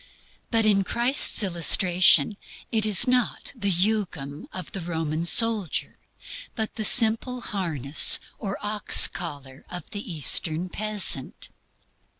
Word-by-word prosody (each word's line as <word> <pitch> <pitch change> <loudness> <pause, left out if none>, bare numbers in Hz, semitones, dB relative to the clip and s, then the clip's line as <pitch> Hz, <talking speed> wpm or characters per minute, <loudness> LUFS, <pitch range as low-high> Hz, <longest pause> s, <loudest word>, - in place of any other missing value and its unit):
But 225 -2 0
in 200 -2 +1
Christ's 240 +2 +2
illustration 180 -1 +2 0.4
it 220 -2 +2
is 210 +2 +4
not 250 -1 -2
the 200 -5 -3
jugum 180 -7 -4
of 185 - -9
the 195 - -7
Roman 165 -1 -5
soldier, 220 -1 0 0.6
but 220 -2 -4
the 220 - -5
simple 230 +3 +3
"harness" 155 - +2 0.2
or 200 -3 -6
"ox 210 -1 +4
collar" 140 -6 -9
of 180 -3 -10
the 205 -2 -7
Eastern 160 +2 0
peasant. 205 -10 -1
195 Hz, 120 wpm, -22 LUFS, 165-220 Hz, 0.6 s, is